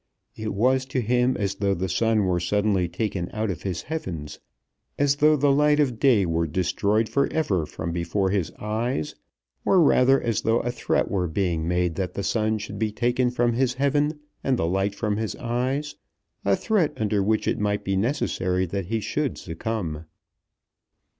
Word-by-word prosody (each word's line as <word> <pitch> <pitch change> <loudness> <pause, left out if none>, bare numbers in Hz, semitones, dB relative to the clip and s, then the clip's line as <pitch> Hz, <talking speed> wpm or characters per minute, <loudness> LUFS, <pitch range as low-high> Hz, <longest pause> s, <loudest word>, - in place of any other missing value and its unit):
It 110 -2 -4
was 130 +5 +2
to 135 -1 -1
him 125 +2 +1
as 100 -2 -1
though 100 0 0
the 95 +2 -2
sun 110 +3 +2
were 90 -1 +1
suddenly 95 0 +1
taken 90 -1 -3
out 110 -1 -1
of 90 - -6
his 90 -3 -3
heaven, 90 - -4 0.7
as 140 0 +2
though 150 +1 +5
the 145 -1 +3
light 150 +1 +3
of 125 -6 +1
day 120 -9 +4
were 85 0 0
destroyed 100 +6 +1
for 140 +4 0
ever 95 - 0
from 85 - -5
before 85 +3 -1
his 95 -5 0
eyes, 110 - -2 0.5
or 190 - +4
rather 135 -4 +5
as 115 -3 -1
though 115 +1 +2
a 120 - -2
threat 120 - 0
were 95 -3 0
being 85 -1 -1
made 90 -1 +1
that 95 -2 -3
the 100 - -2
sun 110 0 +1
should 105 0 -7
be 110 -1 0
taken 125 +3 +1
from 120 -1 +1
his 125 +1 +1
heaven 145 +3 +1 0.2
and 130 -2 +1
the 80 - 0
light 95 +3 0
from 105 -1 -1
his 110 -1 -3
eyes, 130 +5 -2 0.5
a 100 0 +3
threat 200 - +1
under 105 -2 +1
which 110 +2 +1
it - - 0
might 105 0 0
be 95 - -1
necessary 95 -5 0
that 95 0 -4
he 110 +2 -1
should 145 +5 -2
succumb. 85 -3 -4
110 Hz, 185 wpm, -25 LUFS, 95-125 Hz, 0.7 s, though